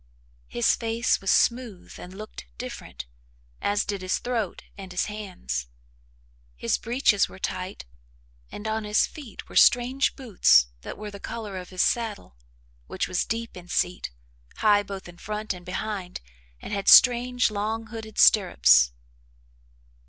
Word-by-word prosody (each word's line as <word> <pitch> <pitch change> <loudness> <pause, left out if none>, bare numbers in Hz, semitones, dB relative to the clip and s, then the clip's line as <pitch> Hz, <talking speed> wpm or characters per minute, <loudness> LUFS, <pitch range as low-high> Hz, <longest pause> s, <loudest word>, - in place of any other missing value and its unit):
His 120 - +2
face 230 +1 0
was 195 - -2
smooth 235 -5 0
and 180 - -9
looked 205 - -10
different, - - -8 0.6
as 205 0 0
did 200 -2 -3
his 185 0 0
throat 230 -6 -3
and 195 -2 -10
his 180 - 0
hands. 180 - -5 0.9
His 90 - -1
breeches 235 -4 +2
were - - -12
tight 185 0 -5 0.7
and 210 - -7
on 220 0 -1
his 210 0 +2
feet 280 -8 -11
were - - -13
strange 250 +3 +4
boots 180 - +4
that - - -8
were 210 0 -7
the 200 - -10
colour 215 -2 -6
of 180 -1 -7
his 185 -1 0
saddle, 220 - -2 0.5
which - - -2
was - - -1
deep 230 +1 -4
in 180 -1 -11
seat, 180 0 -1 0.5
high 205 -1 +4
both 195 -2 -8
in 175 -1 -14
front 210 0 -4
and 180 -1 -11
behind 185 -1 -4 0.4
and - - -7
had 200 -1 -3
strange 245 -1 +6
long 215 +2 -2
hooded 220 -1 -9
stirrups. 60 - +5
205 Hz, 145 wpm, -25 LUFS, 185-225 Hz, 0.9 s, strange